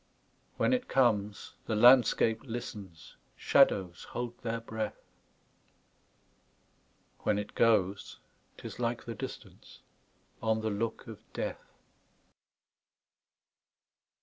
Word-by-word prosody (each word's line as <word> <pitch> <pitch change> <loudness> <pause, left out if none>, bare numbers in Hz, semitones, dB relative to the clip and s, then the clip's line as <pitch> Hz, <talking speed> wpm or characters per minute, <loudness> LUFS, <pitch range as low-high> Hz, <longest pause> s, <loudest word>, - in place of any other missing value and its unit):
When - - +2
it 255 0 0
comes, 105 -6 +1
the 110 - 0
landscape 115 -1 +5
listens, 105 - -8 0.2
Shadows 90 -3 +3
hold 120 -1 -5
their 115 -1 -3
breath; 110 -2 -5 2.2
When 105 - +1
it 105 - -5
goes, 100 -4 +2 0.4
't - - -13
is - - -7
like 120 -1 -2
the 115 - -5
distanceOn 110 0 -7
the 110 - 0
look 110 +2 -3
of - - -9
death. - - -5
110 Hz, 95 wpm, -31 LUFS, 105-120 Hz, 2.2 s, landscape